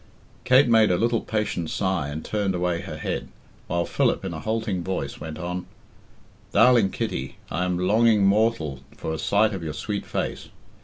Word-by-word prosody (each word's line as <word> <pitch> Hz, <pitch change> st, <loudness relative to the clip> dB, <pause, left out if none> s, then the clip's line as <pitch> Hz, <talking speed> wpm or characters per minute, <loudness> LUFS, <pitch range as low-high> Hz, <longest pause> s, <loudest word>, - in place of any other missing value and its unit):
Kate 130 Hz, +1 st, +6 dB
made 110 Hz, -2 st, +5 dB
a 90 Hz, -, +2 dB
little 115 Hz, +2 st, +1 dB
patient 105 Hz, -7 st, -2 dB
sigh 95 Hz, -7 st, -1 dB
and 75 Hz, +2 st, -6 dB
turned 100 Hz, -3 st, -1 dB
away 90 Hz, -1 st, 0 dB
her -, -, -7 dB
head, -, -, -3 dB, 0.4 s
while 85 Hz, 0 st, 0 dB
Philip, -, -, 0 dB
in 90 Hz, -, -3 dB
a 80 Hz, -, -5 dB
halting 110 Hz, -3 st, -2 dB
voice, 95 Hz, +1 st, -3 dB
went 80 Hz, -1 st, -6 dB
on 90 Hz, +1 st, -4 dB, 0.8 s
"Darling 115 Hz, -2 st, +5 dB
Kitty, 65 Hz, -7 st, -4 dB
I 90 Hz, +4 st, 0 dB
am 90 Hz, -1 st, 0 dB
longing 105 Hz, +3 st, +4 dB
mortal 100 Hz, -, +2 dB, 0.2 s
for 80 Hz, -, -3 dB
a 80 Hz, -, -4 dB
sight 105 Hz, +1 st, +2 dB
of 95 Hz, -, -4 dB
your 80 Hz, -2 st, -4 dB
sweet 100 Hz, +5 st, -4 dB
face. -, -, -3 dB
95 Hz, 175 wpm, -24 LUFS, 85-110 Hz, 0.8 s, Kate